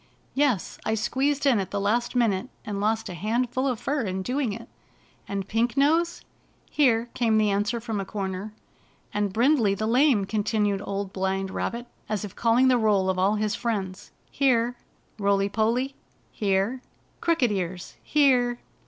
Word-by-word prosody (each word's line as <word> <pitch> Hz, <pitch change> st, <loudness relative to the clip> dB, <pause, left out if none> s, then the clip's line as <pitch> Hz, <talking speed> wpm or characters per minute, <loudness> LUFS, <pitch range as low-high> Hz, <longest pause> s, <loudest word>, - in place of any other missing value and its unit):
"Yes, 265 Hz, -9 st, 0 dB
I 220 Hz, -, 0 dB
squeezed 275 Hz, +6 st, 0 dB
in 255 Hz, -6 st, +4 dB
at 190 Hz, -, -3 dB
the 200 Hz, -, -2 dB
last 225 Hz, +5 st, 0 dB
minute, 215 Hz, -6 st, +1 dB, 0.2 s
and 200 Hz, -1 st, -3 dB
lost 220 Hz, +1 st, 0 dB
a -, -, -6 dB
handful 240 Hz, -, -1 dB
of 250 Hz, -4 st, -1 dB
fur 285 Hz, 0 st, -1 dB
in 190 Hz, -3 st, -3 dB
doing 255 Hz, +1 st, -1 dB
it." 230 Hz, +3 st, -7 dB, 0.6 s
"And 195 Hz, -1 st, -3 dB
Pink 230 Hz, +4 st, 0 dB
Nose?" 325 Hz, +5 st, +2 dB, 0.2 s
" -, -, -37 dB
Here 240 Hz, -5 st, +3 dB
I -, -, -10 dB
" -, -, -13 dB
came 225 Hz, -3 st, +3 dB
the 210 Hz, -1 st, +3 dB
answer 205 Hz, +4 st, 0 dB
from 225 Hz, -3 st, -3 dB
a -, -, -1 dB
comer. 195 Hz, 0 st, -4 dB, 0.6 s
"And 205 Hz, -1 st, 0 dB
Brindley 230 Hz, -2 st, +3 dB
the 215 Hz, -, -2 dB
Lame?" 245 Hz, -2 st, +3 dB
ccaitinued 205 Hz, -1 st, 0 dB
Old 200 Hz, -1 st, -3 dB
Blind 190 Hz, 0 st, -1 dB
Rabbit, 235 Hz, +4 st, -3 dB, 0.2 s
as 210 Hz, -1 st, -2 dB
if 200 Hz, -, -10 dB
calling 235 Hz, +3 st, +3 dB
the 250 Hz, -2 st, +4 dB
roll 200 Hz, -4 st, +3 dB
of 185 Hz, -, -4 dB
idl 195 Hz, +3 st, +2 dB
his 210 Hz, 0 st, 0 dB
friends. 200 Hz, -6 st, -3 dB, 0.2 s
"Here!" 245 Hz, -3 st, +2 dB, 0.4 s
"Roily 200 Hz, 0 st, +2 dB
PoDy?" 230 Hz, +6 st, 0 dB, 0.4 s
"Here!" 200 Hz, +5 st, 0 dB, 0.4 s
"Crooked 325 Hz, -9 st, +2 dB
Ears?" 180 Hz, -2 st, -4 dB
"Here!" 250 Hz, -5 st, +3 dB
220 Hz, 170 wpm, -26 LUFS, 200-245 Hz, 0.6 s, in